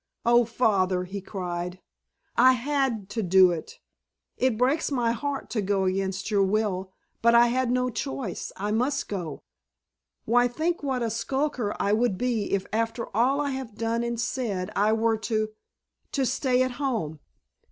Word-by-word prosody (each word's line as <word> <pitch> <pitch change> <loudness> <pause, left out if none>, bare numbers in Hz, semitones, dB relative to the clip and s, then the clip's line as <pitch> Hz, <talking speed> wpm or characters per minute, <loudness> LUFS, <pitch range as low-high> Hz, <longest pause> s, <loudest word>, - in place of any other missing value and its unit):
"Oh, 240 0 +5
Father," 195 -6 +1
he 195 +2 -6
cried, 180 -2 -4 0.6
"I 255 +2 +7
had 255 -5 -1
to 225 - -2
do 185 -1 +6
it! 165 -2 -6 0.6
It 255 -3 +1
breaks 275 +6 +1
my 240 -4 +1
heart 275 +4 -3
to 220 - 0
go 195 0 +1
against 190 +1 -1
your 200 -1 +3
will. 195 -2 0 0.3
But 235 0 +5
I 240 0 +6
had 255 0 +1
no 250 0 +1
choice. 245 -5 -4
I 205 +2 -2
must 255 +6 0
go. 175 -7 -5 0.8
Why, 245 +2 +4
think 320 +8 -1
what 265 -4 -1
a 230 - -1
skulker 250 -1 -1
I 200 - +2
would 220 -3 +2
be 235 -3 -1
if 195 -1 0
after 225 0 -2
all 255 +5 +3
I 285 -1 -1
have 260 -5 -5
done 230 +1 -1
and 235 -1 -2
said 215 -6 -2
I 210 +2 +3
were 225 0 +2
to—to 215 +5 -4
stay 255 0 +2
at 255 - -1
home!" 190 - -2
230 Hz, 165 wpm, -26 LUFS, 195-250 Hz, 0.8 s, I